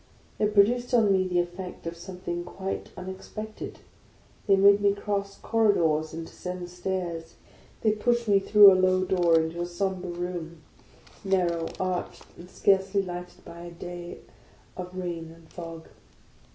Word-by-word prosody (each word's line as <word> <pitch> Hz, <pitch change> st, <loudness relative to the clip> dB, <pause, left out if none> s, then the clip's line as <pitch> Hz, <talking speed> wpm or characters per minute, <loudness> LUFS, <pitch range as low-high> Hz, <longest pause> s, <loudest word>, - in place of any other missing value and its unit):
It 210 Hz, 0 st, +1 dB
produced 240 Hz, +5 st, +4 dB
on 220 Hz, -4 st, +4 dB
me 185 Hz, -1 st, +2 dB
the 180 Hz, -1 st, -1 dB
effect 175 Hz, +1 st, -5 dB
of 165 Hz, 0 st, -4 dB
something 175 Hz, 0 st, -5 dB
quite 190 Hz, +2 st, -5 dB
unexpected. 190 Hz, +4 st, -7 dB, 0.7 s
They 195 Hz, -, +6 dB
made 200 Hz, +1 st, +6 dB
me 200 Hz, 0 st, +3 dB
cross 200 Hz, -1 st, -3 dB
corri 225 Hz, -3 st, +3 dB
dors, 155 Hz, -2 st, +1 dB
and 165 Hz, 0 st, -6 dB
descend 180 Hz, +1 st, -7 dB
stairs, 175 Hz, -2 st, -4 dB, 0.5 s
they 215 Hz, -, +3 dB
pushed 235 Hz, +2 st, 0 dB
me 200 Hz, -1 st, +5 dB
through 205 Hz, 0 st, +8 dB
a 185 Hz, 0 st, +3 dB
low 185 Hz, 0 st, +3 dB
door 175 Hz, -3 st, +4 dB
into 160 Hz, +2 st, -2 dB
a -, -, 0 dB
sombre 185 Hz, 0 st, -2 dB
room, 175 Hz, -2 st, -5 dB, 0.6 s
narrow, 175 Hz, -4 st, +1 dB
arched, 185 Hz, -1 st, -3 dB
and 175 Hz, +1 st, -12 dB
scarcely 195 Hz, +1 st, +2 dB
lighted 180 Hz, -1 st, -8 dB
by 170 Hz, -, -10 dB
a 175 Hz, 0 st, -8 dB
day 175 Hz, 0 st, -8 dB, 0.5 s
of 180 Hz, 0 st, -7 dB
rain 170 Hz, -3 st, -4 dB
and 165 Hz, -1 st, -19 dB
fog. 165 Hz, -2 st, -8 dB
185 Hz, 150 wpm, -27 LUFS, 175-200 Hz, 0.7 s, through